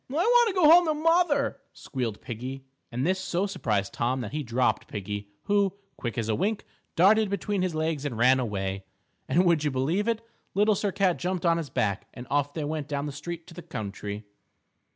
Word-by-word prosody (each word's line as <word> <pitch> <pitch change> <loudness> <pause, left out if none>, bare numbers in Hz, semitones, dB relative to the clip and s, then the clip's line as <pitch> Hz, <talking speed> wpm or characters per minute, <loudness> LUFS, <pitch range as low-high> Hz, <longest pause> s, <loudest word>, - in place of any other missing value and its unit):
"I - - -7
want 475 +8 +5
to 400 - -1
go 355 -5 +5
home 340 +2 +8
to 310 - +2
mother," 315 -3 +2
squealed 120 -6 -4
Piggie, 130 +3 -6 0.3
and 125 +3 -1
this 185 +2 +1
so 185 0 -1
surprised 105 - -1
Tom 125 +2 0
that 110 -4 -5
he 150 - -2
dropped 125 -1 0
Piggie, 105 0 -5
who, 200 -1 +1 0.2
quick 120 -4 -5
as 115 -2 -1
a 110 - +1
wink, 205 - -1 0.3
darted 210 +4 +5
between 200 0 -1
his 180 -3 -1
legs 155 -2 -1
and 135 -6 -3
ran 130 +3 +5
away. 95 -5 -2 0.5
And, 180 +3 +4
would 170 -4 +3
you 150 - +2
believe 150 - 0
it? 230 -1 -1 0.3
Little 210 +2 +4
Sir 200 0 -1
Cat 190 -2 +2
jumped 180 -1 -2
on 170 0 +4
his 160 -4 -4
back, 100 -2 -1
and 120 - -8
off 145 0 +1
they 155 - -2
went 150 -1 -3
down 145 -1 -2
the 145 - -3
street 165 +4 -6
to - - -13
the 175 - -8
country. 105 - -6
160 Hz, 210 wpm, -27 LUFS, 125-200 Hz, 0.5 s, home